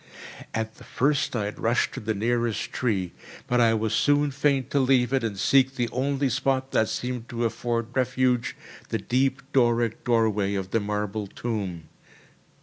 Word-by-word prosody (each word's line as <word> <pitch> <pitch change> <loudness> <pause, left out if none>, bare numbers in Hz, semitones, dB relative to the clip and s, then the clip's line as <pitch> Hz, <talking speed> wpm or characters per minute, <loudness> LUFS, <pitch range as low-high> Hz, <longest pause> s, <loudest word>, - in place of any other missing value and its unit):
At 110 0 -3
the - - -14
first 145 0 0
I 105 -3 0
had 105 - -6
rushed 115 +2 +1
to - - -5
the 110 0 -2
nearest 115 +1 -1
tree; 100 -8 -1 0.3
but 125 0 +2
I 115 -1 +4
was 110 0 -1
soon 145 0 +3
fain 140 -1 +1
to 140 - +1
leave 130 -1 +3
it 135 - +2
and 105 -3 -2
seek 135 +5 +3
the 120 -3 -1
only 140 +3 0
spot 135 0 0
that 110 - +2
seemed 125 -2 -4
to 120 0 -2
afford 115 0 -2
refuge, 130 -1 +1 0.3
the - - 0
deep 130 +2 0
Doric 120 -3 +2
doorway 110 -4 +1
of 95 -1 -4
the 115 - +2
marble 105 0 -3
tomb. 95 -7 -4
120 Hz, 170 wpm, -26 LUFS, 110-130 Hz, 0.3 s, I